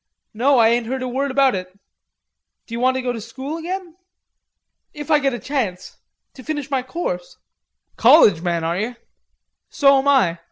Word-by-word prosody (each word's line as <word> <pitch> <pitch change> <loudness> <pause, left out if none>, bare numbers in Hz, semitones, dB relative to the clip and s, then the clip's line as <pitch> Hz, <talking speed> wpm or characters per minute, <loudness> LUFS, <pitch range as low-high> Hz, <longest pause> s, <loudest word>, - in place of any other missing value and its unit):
No 260 +5 +2
I 225 -1 +5
ain't 235 0 0
heard 260 +1 -3
a - - -3
word 270 +3 -2
about 270 -1 +3
it. 185 0 -6 0.9
D'you 230 0 -6
want 255 +1 +2
to 260 - -3
go 250 -1 -1
to 230 - -6
school 265 +8 -7
again?" 355 0 -6 1.0
"If 295 +1 -6
I 300 - +5
get 275 -3 0
a - - -4
chance. 235 -11 -4 0.4
To 260 - -13
finish 295 -2 -5
my 265 -2 +1
course." 250 - -5 0.6
"College 225 - +6
man, 170 -2 -1
are 165 +2 -1
ye? 235 +4 -3 0.7
So 275 -1 +4
am 270 - -2
I. 215 -12 +3
255 Hz, 175 wpm, -20 LUFS, 225-280 Hz, 1.0 s, College